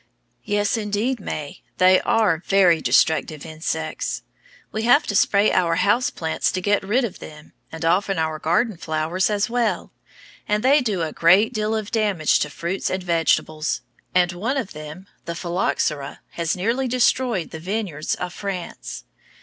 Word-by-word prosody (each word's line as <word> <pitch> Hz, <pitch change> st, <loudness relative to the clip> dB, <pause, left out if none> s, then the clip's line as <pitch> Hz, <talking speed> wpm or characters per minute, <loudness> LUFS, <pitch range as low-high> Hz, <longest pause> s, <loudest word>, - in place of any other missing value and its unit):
Yes, 205 Hz, +1 st, +1 dB
indeed, 220 Hz, +4 st, -1 dB
May, 150 Hz, -7 st, -6 dB, 0.2 s
they 185 Hz, 0 st, +6 dB
are 195 Hz, -8 st, +2 dB
very 180 Hz, -5 st, +4 dB
destructive 155 Hz, -1 st, +2 dB
insects. 160 Hz, 0 st, -3 dB, 0.5 s
We 220 Hz, -, -3 dB
have 245 Hz, +7 st, +4 dB
to 205 Hz, -, -3 dB
spray 200 Hz, +2 st, +4 dB
our 170 Hz, -2 st, +2 dB
house 205 Hz, +8 st, +2 dB
plants 160 Hz, -1 st, -1 dB
to 185 Hz, -, -1 dB
get 205 Hz, +2 st, +1 dB
rid 225 Hz, +6 st, +1 dB
of 205 Hz, -, -7 dB
them, 150 Hz, 0 st, -12 dB, 0.2 s
and 160 Hz, 0 st, -5 dB
often 195 Hz, +4 st, +2 dB
our 160 Hz, -1 st, -1 dB
garden 180 Hz, +7 st, +1 dB
flowers 160 Hz, +4 st, -1 dB
as 205 Hz, -1 st, +1 dB
well, 235 Hz, -2 st, -1 dB, 0.6 s
and 210 Hz, +1 st, 0 dB
they 280 Hz, +3 st, +5 dB
do 205 Hz, -8 st, -1 dB
a 155 Hz, -, -3 dB
great 190 Hz, +8 st, +4 dB
deal 215 Hz, 0 st, -1 dB
of 215 Hz, -1 st, -4 dB
damage 205 Hz, -8 st, +2 dB
to 150 Hz, -, -1 dB
fruits 170 Hz, +5 st, -3 dB
and 185 Hz, 0 st, -2 dB
vegetables, 165 Hz, -2 st, 0 dB, 0.3 s
and 180 Hz, -1 st, +4 dB
one 225 Hz, +10 st, -2 dB
of 230 Hz, -7 st, -3 dB
them, 155 Hz, +4 st, -9 dB, 0.2 s
the 170 Hz, -, -4 dB
phylloxera, 165 Hz, -5 st, -2 dB
has 170 Hz, -2 st, -1 dB
nearly 230 Hz, +8 st, 0 dB
destroyed 245 Hz, -5 st, +1 dB
the 160 Hz, -, -7 dB
vineyards 180 Hz, -4 st, -3 dB
of 180 Hz, -1 st, -5 dB
France. 190 Hz, -4 st, -6 dB
185 Hz, 160 wpm, -22 LUFS, 165-215 Hz, 0.6 s, they